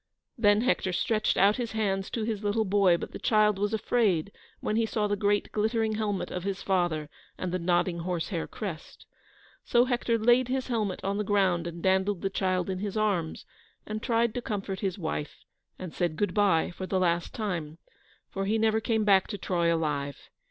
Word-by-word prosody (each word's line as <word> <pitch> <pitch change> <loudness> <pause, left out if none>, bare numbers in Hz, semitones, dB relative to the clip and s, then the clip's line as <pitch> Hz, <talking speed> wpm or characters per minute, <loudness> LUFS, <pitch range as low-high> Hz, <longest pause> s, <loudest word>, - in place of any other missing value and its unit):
Then 210 -4 +4
Hector 235 -6 +1
stretched 215 +4 +1
out 200 +2 +4
his 240 -3 -3
hands 195 -3 -1
to 230 - -3
his 215 -2 -3
little 210 +2 +1
boy, 195 -3 +4
but - - -7
the - - -7
child 210 -2 +3
was 205 +1 0
afraid 210 -5 +1 0.3
when 210 - -2
he 225 0 +2
saw 215 -1 0
the 205 0 +1
great 205 0 0
glittering 220 +1 0
helmet 210 -3 -2
of 180 - -4
his 195 0 -3
father 175 -5 0 0.3
and 185 - -3
the 185 - -1
nodding 175 0 +1
horsehair 170 0 -3
crest. 185 -8 -7 0.6
So 240 +1 +3
Hector 240 -2 0
laid 240 +3 +4
his 260 0 -2
helmet 215 -6 -1
on 195 +1 -1
the - - +1
ground 190 -4 +1
and 170 0 -7
dandled 190 0 +1
the 195 - 0
child 185 -2 0
in 190 -1 -3
his 205 +1 -3
arms, 195 -7 -1 0.4
and 215 0 -4
tried 230 -1 +1
to 245 - -3
comfort 195 -4 -4
his 195 -2 -2
wife, 160 -4 -5 0.3
and 180 -3 -7
said 175 -3 -1
good 205 +5 -1
bye 200 -7 +3
for 185 +2 -6
the 190 - 0
last 170 -2 0
time, 170 -8 -3 0.5
for 195 -1 -4
he 220 +2 +2
never 220 0 +2
came 220 -1 +1
back 195 -2 +4
to 205 - -5
Troy 170 -3 0
alive. 150 -4 -1
200 Hz, 195 wpm, -28 LUFS, 180-215 Hz, 0.6 s, Then